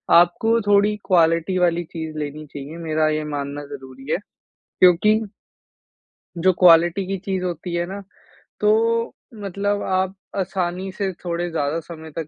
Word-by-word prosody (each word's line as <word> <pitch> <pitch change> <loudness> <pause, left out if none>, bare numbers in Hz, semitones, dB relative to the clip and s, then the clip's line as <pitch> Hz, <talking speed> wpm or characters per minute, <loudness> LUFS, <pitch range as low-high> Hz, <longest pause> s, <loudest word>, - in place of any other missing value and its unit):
आपको 200 +7 +4
थोड़ी 205 +1 +4
क्वालिटी 170 0 +3
वाली 175 -1 +2
चीज़ 160 -2 -5
लेनी 150 +1 -5
चाहिए 145 +3 -7
मेरा 155 -1 +1
ये 155 0 -1
मानना 145 -1 -4
ज़रूरी 135 0 -9
है, - - +2 0.6
क्योंकि 185 +5 +5 1.2
जो 185 +3 +4
क्वालिटी 175 +1 +6
की 195 - -2
चीज़ 190 -2 -1
होती 175 0 -4
है 175 0 0
ना, 195 +2 -7 0.6
तो 230 +2 +2 0.3
मतलब 200 +1 -1
आप 190 0 0 0.2
आसानी 185 0 -2
से 195 0 -2
थोड़े 175 0 -2
ज़्यादा 155 0 -1
समय 160 -1 -10
तक 160 -2 -3
175 Hz, 140 wpm, -22 LUFS, 155-195 Hz, 1.2 s, क्वालिटी